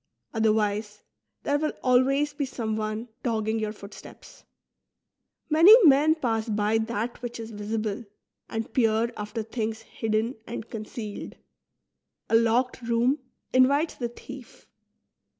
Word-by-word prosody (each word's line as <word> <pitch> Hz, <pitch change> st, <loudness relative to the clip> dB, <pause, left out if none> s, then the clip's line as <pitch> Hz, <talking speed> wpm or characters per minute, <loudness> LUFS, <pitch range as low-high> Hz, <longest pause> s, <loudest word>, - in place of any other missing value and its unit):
Othenvise, 215 Hz, -1 st, 0 dB, 0.4 s
there 290 Hz, 0 st, +1 dB
will 305 Hz, 0 st, -1 dB
always 270 Hz, +3 st, +3 dB
be 290 Hz, -, -2 dB
someone 220 Hz, -2 st, -3 dB
dogging 220 Hz, -2 st, -1 dB
your 215 Hz, -1 st, -2 dB
footsteps. 200 Hz, -1 st, -13 dB, 1.0 s
Many 330 Hz, +8 st, +8 dB
men 300 Hz, +2 st, +6 dB
pass 230 Hz, -6 st, -1 dB
by 215 Hz, +1 st, +1 dB
that 230 Hz, +1 st, -3 dB
which 240 Hz, -1 st, -6 dB
is 225 Hz, 0 st, -7 dB
visible, 215 Hz, +1 st, -3 dB, 0.4 s
and 225 Hz, 0 st, -4 dB
peer 230 Hz, -1 st, +2 dB
after 210 Hz, +2 st, -4 dB
things 225 Hz, 0 st, -3 dB
hidden 225 Hz, +2 st, -2 dB
and 230 Hz, -1 st, -6 dB
concealed; 215 Hz, -1 st, -6 dB, 0.9 s
a -, -, +3 dB
locked 235 Hz, +3 st, +2 dB
room 240 Hz, +4 st, +1 dB, 0.3 s
in 255 Hz, 0 st, +6 dB
vites 290 Hz, +4 st, +1 dB
the 240 Hz, -2 st, -4 dB
thief. 255 Hz, +1 st, -12 dB
225 Hz, 120 wpm, -26 LUFS, 220-255 Hz, 1.0 s, Many